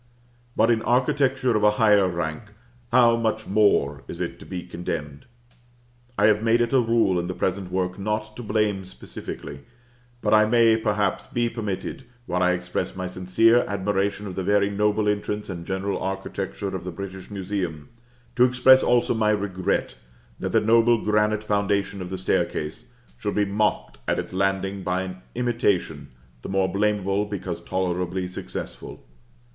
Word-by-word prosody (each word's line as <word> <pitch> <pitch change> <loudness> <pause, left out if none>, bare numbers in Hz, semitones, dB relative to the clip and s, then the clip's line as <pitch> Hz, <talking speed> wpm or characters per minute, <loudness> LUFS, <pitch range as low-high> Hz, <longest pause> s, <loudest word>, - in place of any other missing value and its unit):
But 115 +2 +4
in 115 -1 +2
architecture 130 0 +2
of 105 - +2
a 105 - +7
higher 105 -3 +5
rank, 85 +1 -3 0.5
how 120 -2 +6
much 110 -1 -1
more 95 -9 +2
is - - -7
it - - -4
to - - -12
be 90 -2 -5
condemned? 75 -4 -6 0.9
I 105 - +4
have 105 0 +4
made 115 +1 +3
it 120 +2 0
a 135 - +6
rule 115 -6 +2
in 85 - -3
the 90 - -4
present 95 -1 -2
work 90 0 -2
not 105 +1 -3
to - - -7
blame 105 -3 0
specifically; 70 -5 -8 0.6
but - - +1
I 110 0 +6
may, 115 0 +5
perhaps, 105 -3 0
be 120 -3 0
permitted, 105 -5 -4 0.2
while 90 -3 -1
I 90 0 +4
express 90 0 -3
my 95 0 -4
sincere 95 +6 +3
admiration 100 +1 -1
of 95 - -5
the 95 - -3
very 100 +1 +2
noble 105 +1 +1
entrance 105 0 -2
and 85 -2 -7
general 95 +1 -2
architecture 95 0 -4
of 95 - -5
the 90 - -5
British 95 +1 -8
Museum, 95 -6 -4 0.5
to 125 - +5
express 125 +1 +6
also 120 0 +2
my 110 -2 +1
regret 100 -2 -1 0.5
that - - -3
the - - +3
noble 115 +2 +4
granite 105 0 +1
foundation 100 -1 0
of 90 - -6
the 95 - -4
staircase 90 +3 -2 0.3
should 105 - -2
be 105 - +2
mocked 105 - -1
at - - +1
its - - -4
landing 95 +1 0
by 90 0 -1
an 95 0 -6 0.2
imitation, 100 - 0 0.3
the - - -7
more 95 -1 +2
blameable 100 0 +1
because 95 -4 -5
tolerably 90 0 -2
successful. 90 -8 -7
100 Hz, 165 wpm, -24 LUFS, 95-110 Hz, 0.9 s, a